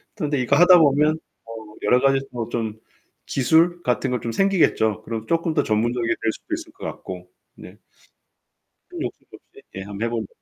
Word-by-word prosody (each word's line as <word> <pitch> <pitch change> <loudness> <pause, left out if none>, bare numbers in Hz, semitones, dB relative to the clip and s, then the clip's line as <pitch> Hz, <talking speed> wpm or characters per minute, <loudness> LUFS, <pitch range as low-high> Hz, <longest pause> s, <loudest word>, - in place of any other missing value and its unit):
근데 150 -8 -1
이거 125 - +2
하다 180 +1 +8
보면 150 +1 +3 0.3
어우 110 -2 -10
여러 125 - +4
가지 135 0 +3
뭐 120 -2 -3
좀 110 -2 -3 0.5
기술 165 +6 +2
같은 125 +1 0
거 125 - -1
좀 115 - -4
생기겠죠. 160 - +2
그럼 110 -1 -5
쪼끔 165 -1 0
더 145 - +2
전문적이게 115 +2 0
될 110 - +1
수도 325 - -8
있을 330 -1 -5
것 - - -10
같고. - - -7 0.3
네. - - -13 1.1
큰 345 -2 -7
욕심도 - - -7
없이 415 - -20
예, - - -5
한번 100 +3 -4
해 - - -2
보려고. 115 -3 -3
125 Hz, 335 characters per minute, -22 LUFS, 115-165 Hz, 1.1 s, 하다